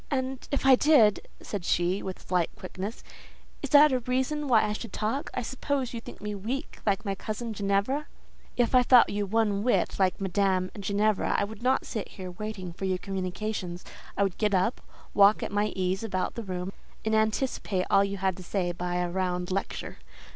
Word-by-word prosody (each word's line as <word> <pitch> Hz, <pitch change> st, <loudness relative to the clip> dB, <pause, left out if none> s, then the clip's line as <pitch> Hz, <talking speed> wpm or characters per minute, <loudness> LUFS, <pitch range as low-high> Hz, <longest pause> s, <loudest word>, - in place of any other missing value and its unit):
"And 260 Hz, -2 st, -2 dB
if 280 Hz, -, -1 dB
I 270 Hz, -, +8 dB
did," 255 Hz, -6 st, +5 dB
said 205 Hz, -4 st, -5 dB
she, 175 Hz, +3 st, +1 dB
with 190 Hz, -1 st, -7 dB
slight 180 Hz, -2 st, +1 dB
quickness, 190 Hz, +4 st, -6 dB, 0.6 s
"is -, -, -4 dB
that 295 Hz, 0 st, +7 dB
a 255 Hz, -, +2 dB
reason 260 Hz, +4 st, -1 dB
why 230 Hz, -4 st, +5 dB
I 210 Hz, 0 st, 0 dB
should 215 Hz, 0 st, -6 dB
talk? 220 Hz, +8 st, -2 dB
I 250 Hz, -, -1 dB
suppose 265 Hz, +1 st, -2 dB
you 230 Hz, -, -4 dB
think -, -, -11 dB
me 210 Hz, 0 st, -3 dB
weak, 225 Hz, +8 st, -4 dB
like 200 Hz, +2 st, +1 dB
my 195 Hz, -, 0 dB
cousin 220 Hz, +3 st, -4 dB
Ginevra?" 200 Hz, +8 st, 0 dB, 0.5 s
"If 240 Hz, 0 st, +2 dB
I 255 Hz, -, +7 dB
thought 245 Hz, 0 st, +6 dB
you 205 Hz, 0 st, -1 dB
one 210 Hz, -1 st, +1 dB
whit 245 Hz, -2 st, +1 dB
like 185 Hz, 0 st, +2 dB
Madame 190 Hz, -1 st, +1 dB
Ginevra, 205 Hz, +1 st, +1 dB
I -, -, +2 dB
would 210 Hz, +1 st, -7 dB
not 260 Hz, +2 st, +2 dB
sit 215 Hz, -4 st, -4 dB
here 185 Hz, -2 st, -8 dB
waiting 190 Hz, -2 st, -6 dB
for 195 Hz, -, -5 dB
your 185 Hz, -1 st, +1 dB
communications. 185 Hz, -1 st, -4 dB, 0.3 s
I 200 Hz, -, +3 dB
would 195 Hz, -3 st, -2 dB
get 210 Hz, -2 st, +2 dB
up, 190 Hz, +6 st, +1 dB, 0.3 s
walk 200 Hz, +1 st, +5 dB
at -, -, -4 dB
my 205 Hz, +1 st, +1 dB
ease 190 Hz, +2 st, -1 dB
about 190 Hz, -4 st, -2 dB
the 235 Hz, -, -5 dB
room, 185 Hz, -2 st, -4 dB, 0.3 s
and 220 Hz, -, +1 dB
anticipate 220 Hz, -3 st, 0 dB
all 195 Hz, -, +6 dB
you 200 Hz, 0 st, -2 dB
had 190 Hz, -1 st, 0 dB
to 185 Hz, -, -9 dB
say 180 Hz, -1 st, -1 dB
by 175 Hz, 0 st, -3 dB
a 180 Hz, 0 st, 0 dB
round 180 Hz, 0 st, -2 dB
lecture. 195 Hz, +1 st, -4 dB
205 Hz, 195 wpm, -28 LUFS, 185-235 Hz, 0.6 s, I